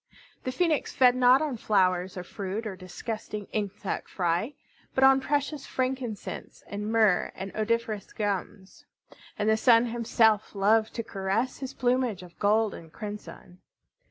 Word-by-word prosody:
The 255 - -1
Phoenix 315 +1 0
fed 250 -1 +6
not 255 +3 +5
on 285 -6 -2
flowers 185 -3 +1
or 180 - -4
fruit 200 +4 -5
or 205 -3 -4
disgusting 210 +3 -6
insect 205 -2 -3
fry, 180 - -1 0.4
but 265 - +3
on 270 0 +7
precious 285 +1 -1
frankincense 255 -4 -4
and 210 +1 -4
myrrh 215 -5 +3
and 190 +1 -6
odoriferous 220 -1 -1
gums. 200 -2 -4 0.5
And 210 - -1
the 220 - +5
Sun 230 +1 +5
himself 225 -3 +2
loved 215 +3 +3
to 230 - -2
caress 200 +6 -2
his 265 -1 -6
plumage 245 -6 0
of 175 -1 -15
gold 215 0 +3
and 160 -1 -11
crimson. 205 -3 -9
220 Hz, 145 wpm, -28 LUFS, 195-250 Hz, 0.5 s, on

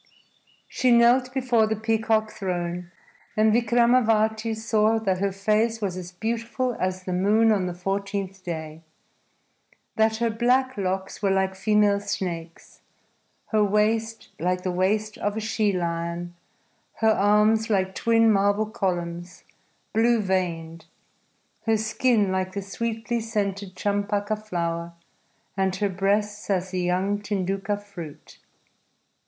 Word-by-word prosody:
She 255 - 0
knelt 240 +2 +5
before 250 -4 +2
the 220 - 0
peacock 220 0 0
throne, 175 -2 -3 0.5
and 215 0 +4
Vikramavati 225 -1 +2
saw 220 0 +2
that 195 -4 0
her 200 0 0
face 215 +4 +1
was 195 -4 -2
as 180 -1 -7
beautiful 230 +5 -2
as 185 0 -2
the 185 - -3
moon 210 +5 +3
on 195 -4 +1
the 175 - -4
fourteenth 195 +1 -3
day, 160 -2 -6 1.2
that 220 0 +3
her 230 0 0
black 255 +3 +2
locks 190 -1 -3
were 200 - +2
like 190 0 +1
female 205 +1 +2
snakes, 180 -5 -5 0.7
her 215 -2 +3
waist 220 +2 0
like 180 +2 -1
the 185 - -1
waist 210 +4 0
of 205 +1 -2
a - - 0
she 215 -1 0
lion, 170 -1 -3 0.6
her 220 -1 +3
arms 215 +2 +3
like 190 -2 +1
twin 225 +1 +3
marble 205 +1 +2
columns 175 -4 -4 0.5
blue 230 +2 +3
veined, 170 -4 -2 0.8
her 225 -1 +4
skin 220 -1 +1
like 185 0 -1
the 200 0 -4
sweetly 230 +3 -3
scented 200 -4 -3
champaka 205 +1 -1
flower, 170 -5 -3 0.6
and 190 -1 0
her 205 -1 0
breasts 205 +2 -1
as 185 -1 0
the 185 -1 -1
young 185 +3 0
tinduka 195 0 -2
fruit. 180 -7 -11
205 Hz, 130 wpm, -25 LUFS, 185-220 Hz, 1.2 s, knelt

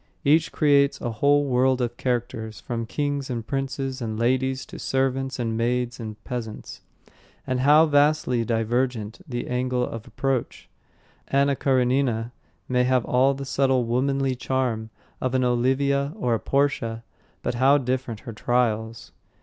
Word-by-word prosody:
Each 155 +3 +4
creates 140 -2 +3
a 120 - -3
whole 145 +6 +3
world 130 0 +2
of 120 -1 -2
characters, 115 -4 -3
from 115 -1 -4
kings 145 +1 -2
and 115 -3 -3
princes 135 0 -3
and 110 -2 -3
ladies 130 +3 0
to - - -10
servants 135 0 -1
and 115 -3 -2
maids 120 +2 -1
and 110 -2 -6
peasants. 120 -4 -6 0.6
But 130 0 -1
how 150 +4 +6
vastly 145 -5 +2
divergent 115 - -1
the 120 -3 -4
angle 125 0 0
of 115 -1 -7
approach! 130 +1 -2 0.6
Anna 140 0 +2
Karenina 125 -3 +1 0.4
may 125 0 +2
have 125 -1 +2
all 130 +2 +3
the 135 0 -6
subtle 135 -2 +2
womanly 135 +3 0
charm 125 -3 -2 0.3
of 130 0 -1
an 130 - +2
Olivia 135 +4 +1
or 145 - 0
a 115 - +1
Portia, 130 -5 0 0.4
but - - -1
how 135 +4 +4
different 125 -4 -3
her 115 - -8
trials. 115 -1 -1
130 Hz, 145 wpm, -24 LUFS, 120-135 Hz, 0.6 s, how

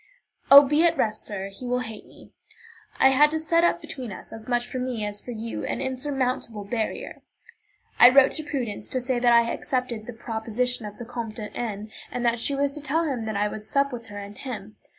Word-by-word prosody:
"Oh, 280 +1 +11
be 300 +4 +3
at 335 -1 +3
rest, 215 -1 0
sir; 195 -1 -4
he 220 +6 -9
will 250 0 0
hate 220 -3 -8
me." - - -17 0.7
I 265 - +6
had 290 +3 +5
to 315 +1 -2
set 335 +2 +2
up 345 0 +3
between 260 -8 -7
us, - - -10
as 225 -1 -9
much 240 -1 0
for 255 - -4
me 250 -4 -2
as 205 0 -4
for - - -11
you, 230 -1 -5
an - - -2
insurmountable 255 -5 -2
barrier. 220 +2 -4 0.8
I 245 - +11
wrote 265 +1 +6
to 310 - -4
Prudence 250 -9 -4
to 260 - -1
say 250 0 -1
that 240 0 +4
I 235 0 +5
accepted 250 -4 -3
the 245 - -6
proposition 225 +1 -2
of 205 - -10
the 240 - -7
Comte 230 -2 -5
de 210 -2 -7
N., 215 -2 -4 0.2
and 245 -1 -3
that 235 0 +2
she 280 +4 0
was 280 0 +1
to 300 - -5
tell 300 +4 0
him 260 -8 -2
that 215 -2 -2
I 205 +1 +2
would 210 0 -6
sup 275 +4 0
with 230 -2 -7
her 205 -2 -9
and 205 0 -8
him. 215 -5 -7
245 Hz, 230 wpm, -25 LUFS, 220-270 Hz, 0.8 s, Oh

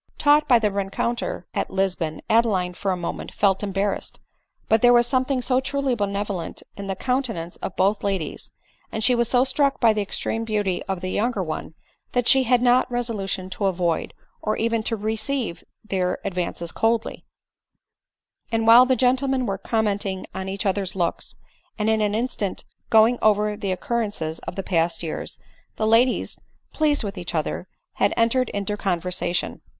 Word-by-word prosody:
Taught 295 0 +4
by 245 - +6
the 215 -3 +1
rencontre 200 +1 -2
at - - -1
Lisbon, 185 -5 -1
Adeline, 205 -6 +2
for 195 +2 -3
a 185 - 0
mo* 175 - -3
ment - - -8
felt 195 -2 +2
embarrassed; 200 0 -2 0.5
but 220 0 +3
there 245 0 +6
was 240 0 +5
something 255 0 0
so 255 +1 +2
truly 275 0 -1
benevolent 200 -4 -3
in 200 0 -7
the 195 - -2
countenance 230 -8 -2
of 190 - -6
both 200 +2 +1
ladies, 195 -5 -3 0.4
and 220 - -2
she 250 - +5
was 235 -1 +1
so 250 0 +4
struck 275 +1 +1
by 230 -3 +5
the 215 - -1
extreme 225 +2 -2
beauty 205 -5 -1
of 190 -2 -3
the 185 0 -3
younger 220 -3 0
one, 155 -1 -5 0.4
that 245 -1 +1
she 265 - +7
had 245 0 +3
not 250 +1 +4
resolution 210 -6 -2
to 195 +1 -1
avoid, 175 -3 0 0.3
or 215 - -1
even 230 0 0
to 225 - 0
receive 220 0 -2 0.2
their 180 -3 0
advances 175 -3 -3
coldly; 225 0 0 1.3
and 225 -1 +1
while 235 +3 +8
the 260 - +3
gentlemen 260 +1 +2
were 195 -3 -2
commenting 205 -4 -1
on 190 0 -4
each 195 +2 -4
other's 195 -1 -1
looks, 175 -3 -2 0.4
and 215 0 +1
in 220 0 +2
an 210 0 +1
instant 220 -4 -2 0.2
go 220 -1 +7
ing 245 +1 -1
over 210 0 +3
the 205 -2 -3
occurrences 185 -5 -2
of - - -4
past 165 -1 0
years, 160 - -5 0.4
the 215 - -1
ladies, 230 +3 +2 0.3
pleased 300 -4 +2
with 200 -2 -5
each 175 -1 -5
other, 160 +3 -2 0.3
had - - +2
entered 230 +2 +2
into 200 0 -2
conversation. 180 -2 -1
210 Hz, 170 wpm, -23 LUFS, 190-240 Hz, 1.3 s, while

